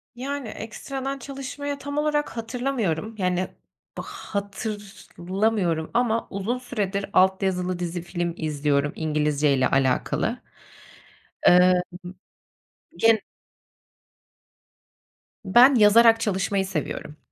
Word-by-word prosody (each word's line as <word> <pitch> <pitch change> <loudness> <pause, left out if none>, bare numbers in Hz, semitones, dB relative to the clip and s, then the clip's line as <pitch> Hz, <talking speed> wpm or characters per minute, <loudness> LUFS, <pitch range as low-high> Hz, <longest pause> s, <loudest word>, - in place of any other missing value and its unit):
Yani, 275 +1 -4
ekstradan 270 +6 -5
çalışmayı 280 +2 -5
tam 285 +1 -5
olarak 295 0 +1
hatırlamıyorum, 225 - -2
yani, 185 -1 0 0.5
bı - - -3
hatırlamıyorum 200 -3 -3
ama 230 -1 +1
uzun 200 +5 -2
süredir 205 -6 -3
alt 190 +1 +4
yazılı 180 -1 -1
dizi, 175 0 -3
film 175 0 -3
izliyorum 145 -2 0
İngilizceyle 150 -3 +1
alakalı. 130 -2 0 1.0
Emm, 180 +1 +7 1.2
gen 225 -1 +4 2.3
Ben 245 +8 +7
yazarak 225 +1 +6
çalışmayı 195 -2 0
seviyorum. 155 -4 -5
200 Hz, 85 wpm, -24 LUFS, 175-240 Hz, 2.3 s, Emm